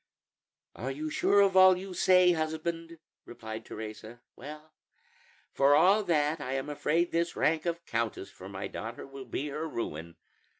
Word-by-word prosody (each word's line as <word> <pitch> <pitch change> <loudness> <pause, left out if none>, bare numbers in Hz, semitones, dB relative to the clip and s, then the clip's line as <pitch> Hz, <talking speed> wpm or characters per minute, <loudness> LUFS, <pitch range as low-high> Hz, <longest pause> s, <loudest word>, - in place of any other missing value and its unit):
"Are 125 +5 -4
you 150 +3 -4
sure 200 +5 +3
of 195 -1 +3
all 185 -1 +7
you 190 0 -7
say, 180 0 +5
husband?" 165 +1 -3 0.3
replied 110 -2 -8
Teresa. 110 +2 -8 0.2
"Well, 155 +1 -11 0.8
for 140 +1 +4
all 195 +7 +5
that, 155 -2 +1
I 130 -1 -4
am 135 +2 -3
afraid 165 +4 0
this 170 +1 0
rank 160 +2 +1
of 170 0 -3
countess 115 -6 -3
for 95 - -11
my 95 0 -5
daughter 115 +1 -7
will 135 -1 -10
be 140 +5 -4
her 155 +3 -4
ruin. 85 - -5
150 Hz, 160 wpm, -29 LUFS, 120-170 Hz, 0.8 s, all